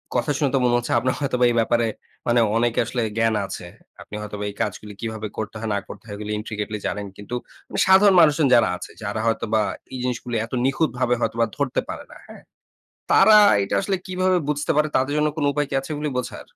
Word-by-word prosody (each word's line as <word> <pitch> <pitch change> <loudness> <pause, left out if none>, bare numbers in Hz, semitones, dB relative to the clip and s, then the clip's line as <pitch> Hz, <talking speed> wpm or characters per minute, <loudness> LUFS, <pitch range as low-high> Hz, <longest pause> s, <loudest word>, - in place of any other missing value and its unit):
কথা 125 +4 +1
শুনে 145 -3 +1
তো - - +3
মনে 120 0 +3
হচ্ছে 120 - -2
আপনার 130 +2 0
হয়তোবা 125 -3 +1
এই - - -2
ব্যাপারে 115 +1 +2 0.4
মানে 120 0 +3 0.2
অনেকে 120 0 +1
আসলে 125 - -2 0.2
জ্ঞান 115 -1 +2
আছে। 90 - -7 0.4
আপনি 105 - -10
হয়তোবা 105 -1 -6
এই 100 - -10
কাজগুলি 105 0 -4
কিভাবে 110 -1 -4
করতে 110 +1 -4
হয়, 110 -1 -4
না - - +1
করতে - - -10
হয় 105 - -6
এগুলি 105 0 -5
intricately 105 -1 -4
জানেন। 105 -1 -3
কিন্তু 105 +4 -6 0.5
সাধারণ 190 0 +6
মানুষজন 150 -2 +4
যারা 115 - +4
আছে - - -9
যারা 105 +1 -3
হয়তোবা 110 -1 +1 0.3
এই - - -4
জিনিসগুলি 120 -1 -3
এত 115 - -15
নিখুঁতভাবে 130 -3 +1
হয়তোবা 115 +1 +1
ধরতে 140 -3 0
পারে - - -6
না। - - -12
হ্যাঁ? - - -12 0.7
তারা 215 -1 +7 0.3
এটা 100 - -2
আসলে 195 0 0
কিভাবে 185 0 +1
বুঝতে 150 0 -1
পারে? 150 0 +3
তাদের 135 +2 +1
জন্য 150 0 +2
কোন 150 - -1
উপায় 145 0 0
কি - - -4
আছে 135 - -11
এগুলি 150 0 -3
বোঝার? 125 - -5
120 Hz, 205 wpm, -23 LUFS, 110-145 Hz, 0.7 s, তারা